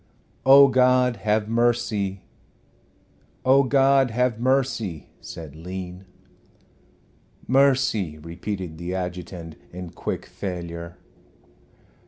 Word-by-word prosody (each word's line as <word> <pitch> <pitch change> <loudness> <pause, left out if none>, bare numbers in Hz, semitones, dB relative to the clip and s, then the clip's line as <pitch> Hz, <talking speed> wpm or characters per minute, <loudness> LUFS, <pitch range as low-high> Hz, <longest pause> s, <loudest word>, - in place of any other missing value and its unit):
"Oh, 140 +1 +9
God, 125 -2 +3
have 105 +1 0
mercy 110 -4 0 0.6
" - - -36
"Oh, 135 +2 +6
God, 135 0 +3
have 120 0 0
mercy 125 - -1
" - - -35
said 80 -4 -9
Lean. 90 +2 -7 1.4
"Mercy," 130 - +2
repeated 85 +1 -6
the 90 +2 -4
adjutant, 90 -3 -6
in 90 -1 -8
quick - - -5
failure. 85 -3 -6
100 Hz, 95 wpm, -24 LUFS, 90-125 Hz, 1.4 s, Oh